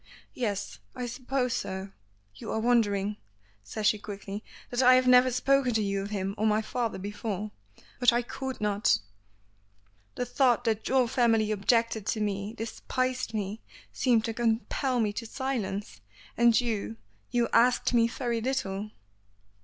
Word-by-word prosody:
"Yes. 210 -5 -3 0.2
I 250 -1 -3
suppose 250 +1 -2
so. 190 -4 -4 0.4
You 100 - -7
are - - 0
wondering," 210 -4 +2 0.5
says 160 - -5
she 215 0 +3
quickly, 205 0 -7 0.3
"that 245 +1 +1
I 255 0 +7
have 255 0 +3
never 250 0 +6
spoken 255 0 +2
to 220 - +2
you 200 -1 -1
of 200 - -5
him 195 -2 -2
or 215 - +2
my 215 0 +3
father 235 0 -2
before. 205 +1 -4 0.5
But 245 -1 +6
I 240 +1 +1
could 265 +2 -5
not. 210 0 +2 1.2
The 250 - -2
thought 250 -2 +2
that 220 -2 -1
your 260 -2 +3
family 225 -3 +2
objected 220 +1 +1
to 220 - 0
me, 205 0 -2
despised 255 +2 -2
me, 210 +1 -3 0.3
seemed 235 -4 +2
to 225 - -2
compel 240 +3 0
me 210 -2 +1
to 230 +2 -5
silence. 215 - -3 0.3
And 235 -1 +5
you 215 - -2 0.3
you 240 -1 +1
asked 245 +2 +4
me 230 -1 +5
very 235 -1 -2
little." 215 -5 -2
225 Hz, 155 wpm, -28 LUFS, 205-250 Hz, 1.2 s, I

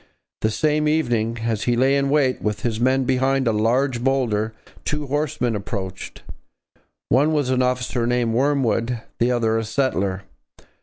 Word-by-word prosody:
The 110 - +2
same 150 +5 +1
evening, 120 -7 0
as 115 -2 -1
he 120 - +2
lay 135 +3 +3
in 140 0 +1
wait 140 -3 +2
with 105 -1 -2
his 115 -1 -2
men 130 +2 +2
behind 130 0 +1
a - - +4
large 120 +3 +1
boulder, 120 -5 +1 0.3
two 150 0 -2
horsemen 135 -5 -1
approached. 100 -2 -6 0.9
One 145 +6 +3
was 145 -4 +1
an 130 0 +2
officer 125 -1 0
named 120 -2 +1
Wormwood, 125 -3 +1 0.2
the 120 +2 +2
other 115 -2 +1
a - - -2
settler. 100 -6 -1
125 Hz, 155 wpm, -22 LUFS, 115-135 Hz, 0.9 s, a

